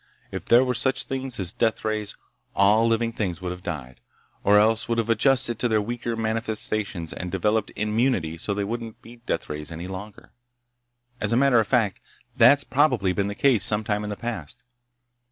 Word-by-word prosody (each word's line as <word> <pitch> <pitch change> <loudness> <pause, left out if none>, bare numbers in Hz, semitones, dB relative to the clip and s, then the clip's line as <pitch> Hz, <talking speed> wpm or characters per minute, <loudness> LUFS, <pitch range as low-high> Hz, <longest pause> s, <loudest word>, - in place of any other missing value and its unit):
If - - -6
there 120 +2 +5
were 125 - 0
such 130 +2 +2
things 130 -3 -3
as 90 -3 +1
deathrays, 110 -1 -1 0.4
all 105 +3 +4
living 115 0 0
things 95 -7 -3
would 90 -1 -4
have 90 0 -8
died, 70 -9 -6 0.4
or 105 +1 +5
else 110 +2 +3
would 115 - 0
have 115 0 0
adjusted 120 0 +3
to 120 - +1
their 110 -2 +2
weaker 120 +2 -3
manifestations 110 -5 -3
and 90 -1 -6
developed 105 +3 0
immunity 105 -7 0
so 100 +4 -3
they 100 - -1
wouldn't 115 +1 -6
be 120 +1 -13
deathrays 75 +1 -4
any 85 +2 -6
longer. 95 +2 -9 0.9
As - - -1
a - - +3
matter 135 -2 +4
of 110 - 0
fact, 115 -7 +1 0.4
that's 140 0 +6
probably 125 -10 +2
been 100 +1 -1
the 100 - -4
case, 125 -8 +3
some 105 +2 +4
time 105 0 -1
in 105 - -4
the 105 - -3
past. 115 - -6
110 Hz, 185 wpm, -24 LUFS, 100-120 Hz, 0.9 s, that's